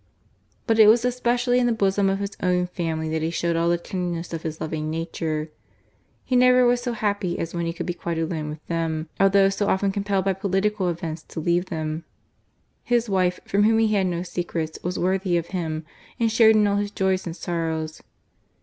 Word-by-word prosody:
But 225 -1 +2
it 215 - +9
was 230 +3 +5
especially 245 0 +1
in 245 - +2
the - - +2
bosom 200 -2 +2
of 195 - 0
his 200 0 -4
own 180 0 +2
family 165 -3 -3
that 160 0 -1
he 160 - 0
showed 170 0 -1
all 165 +1 +2
the 175 - +3
tenderness 175 -1 -4
of 165 - -3
his 160 -1 -5
loving 155 -1 -3
nature. 160 -1 -3 0.7
He 255 - 0
never 250 0 +6
was 245 0 +3
so 245 -1 -2
happy 205 -5 -1
as 165 - -4
when 170 -1 -2
he - - -1
could 165 - -5
be 175 - -2
quite 170 -1 -4
alone 160 -2 -2
with 150 0 -9
them, 165 -1 -2
although 195 0 +5
so 200 +1 -1
often 195 +1 +1
compelled 200 -1 -1
by 195 - +2
political 195 0 0
events 165 -2 -4
to - - -6
leave 175 +3 +1
them. 155 -1 -3 0.8
His 240 -2 0
wife, 180 -1 +1
from 200 - +1
whom 220 +2 +4
he 225 -1 +3
had 195 -2 +2
no 175 -1 -2
secrets, 170 -3 -4
was 180 +1 -3
worthy 185 0 +1
of 170 0 -3
him, 160 -4 -3 0.3
and 230 -1 +2
shared 220 -1 +6
in 210 -1 +4
all 200 0 +2
his 205 0 -1
joys 190 -2 0
and 165 - -5
sorrows. 160 -3 -3
180 Hz, 210 wpm, -24 LUFS, 165-205 Hz, 0.8 s, it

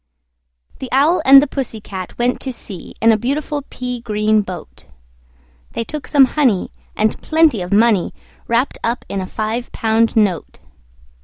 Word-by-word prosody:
The 260 - -6
Owl 290 +7 +3
and 275 +1 +9
the - - -2
Pussy 265 -5 -4
Cat 190 -3 -8
went 245 +1 0
to 265 - -4
sea 205 -6 -8
In 230 - +6
a 220 - +2
beautiful 285 +4 -2
pea 250 -1 -5
green 215 -1 +1
boat: 180 - -9 0.9
They - - -2
took 300 +5 -6
some 280 -3 +6
honey, 255 -8 0 0.2
and 215 0 0
plenty 315 - +2
of 180 - -6
money 210 -3 +3 0.4
Wrapped 235 +4 0
up 235 +1 -2
in 195 - -3
a 185 - -5
five 220 +4 -4
pound 225 0 +1
note. 200 -7 0
230 Hz, 160 wpm, -18 LUFS, 210-270 Hz, 0.9 s, and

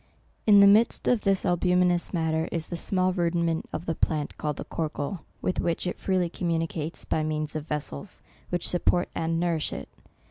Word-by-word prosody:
In 205 -2 +8
the - - +9
midst 215 +3 +4
of 245 -4 +3
this 195 -2 +1
albuminous 180 -1 +2
matter 160 -2 0
is 165 -1 -1
the 175 - -5
small 185 +1 +1
rudiment 170 -2 0
of 170 - -5
the 165 - 0
plant, 150 -2 -1
called 150 -1 -2
the - - -4
corcle, 160 +2 -3 0.2
with 185 - 0
which 170 +1 -1
it 180 - -3
freely 185 -2 +1
communicates, 165 -2 -3
by 155 - 0
means 155 0 -2
of 155 0 -4
vessels 145 - -5 0.3
which 175 -1 -1
support 175 0 +1
and 165 0 -1
nourish 170 -3 0
it. 70 - -6
170 Hz, 180 wpm, -27 LUFS, 160-180 Hz, 0.3 s, the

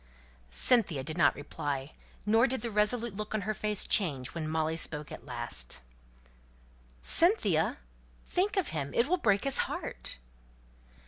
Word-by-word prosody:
Cynthia 170 - +4
did 155 +3 -5
not 170 - +3
reply; 145 -1 -5 0.3
nor 225 +4 +4
did 260 +1 -2
the 235 - -3
resolute 215 +2 +1
look 215 +2 -5
on 215 - -1
her 215 +3 -2
face 210 0 -1
change 140 -10 +2
when 160 -2 -4
Molly 160 0 -1
spoke 150 -2 -3
at 130 - -10
last, 120 - -3 1.2
"Cynthia 205 - +4 0.5
think 395 +3 -1
of 380 - +1
him! 140 -3 -4
It 235 - +3
will 365 +4 +2
break 205 - +2
his 275 -1 +1
heart!" - - -5
195 Hz, 145 wpm, -30 LUFS, 145-235 Hz, 1.2 s, Cynthia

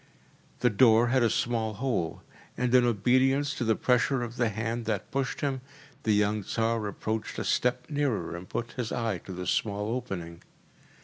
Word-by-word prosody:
The 125 - +4
door 115 +1 +5
had 130 +1 +3
a 115 - +4
small 110 -1 0
hole, 110 -9 -2 0.3
and 125 -1 0
in 125 -1 +6
obedience 130 +5 +2
to 135 - -3
the 110 -1 +2
pressure 125 +2 +2
of 120 +1 -6
the 120 -2 +2
hand 115 +2 -3
that 110 -3 -2
pushed 135 -2 -2
him, 135 -3 -1 0.4
the 110 - +1
young 105 +1 +2
Tsar 115 +1 -1
approached 110 +2 -3
a - - -2
step 125 0 0
nearer 135 - -1
and 90 +2 -9
put 120 0 -3
his 120 -3 -4
eye 115 -6 -1
to 95 - -10
the 90 0 -5
small 105 +2 0
opening. 95 -9 -5
115 Hz, 180 wpm, -28 LUFS, 105-125 Hz, 0.4 s, in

